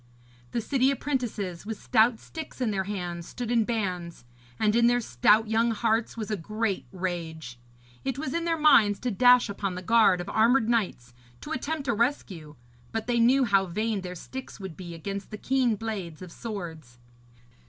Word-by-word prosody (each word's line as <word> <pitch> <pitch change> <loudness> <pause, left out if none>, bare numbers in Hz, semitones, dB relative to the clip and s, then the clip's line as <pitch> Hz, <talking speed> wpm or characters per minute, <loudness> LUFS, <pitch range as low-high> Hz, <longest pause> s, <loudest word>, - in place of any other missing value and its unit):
The 235 - -2
city 265 +3 +2
apprentices, 245 -10 -2
with 220 0 -6
stout 225 0 +3
sticks 315 -4 -9
in 245 -4 0
their 190 -2 -1
hands, 175 -4 -5
stood 240 -2 -5
in 230 -2 +3
bands, 180 - -3 0.3
and 215 0 +2
in 235 0 +5
their 245 0 +3
stout 210 - +3
young 225 +2 +2
hearts 225 +1 0
was 220 -1 -4
a - - +1
great 215 +2 -2
rage. 165 -8 -5 0.4
It 265 -1 -2
was 280 -2 -3
in 335 - -1
their 335 -1 0
minds 230 -10 +5
to 250 - -1
dash 245 +4 +5
upon 200 -2 -3
the 180 - -6
guard 215 -3 +4
of 175 - -5
armoured 225 +3 +3
knights, 190 - -1 0.3
to - - -8
attempt 280 +2 -3
a - - +2
rescue, 200 - -2 0.4
but 225 -1 -3
they 240 -1 +1
knew 255 +4 +5
how 195 -4 +3
vain 210 +3 -1
their 180 -1 -6
sticks 260 +8 -8
would 190 -4 -7
be 175 -2 -8
against 195 +4 -5
the 215 - -6
keen 255 -1 +1
blades 195 -7 -5
of 180 - -10
swords. 165 - -7
215 Hz, 185 wpm, -27 LUFS, 185-240 Hz, 0.4 s, in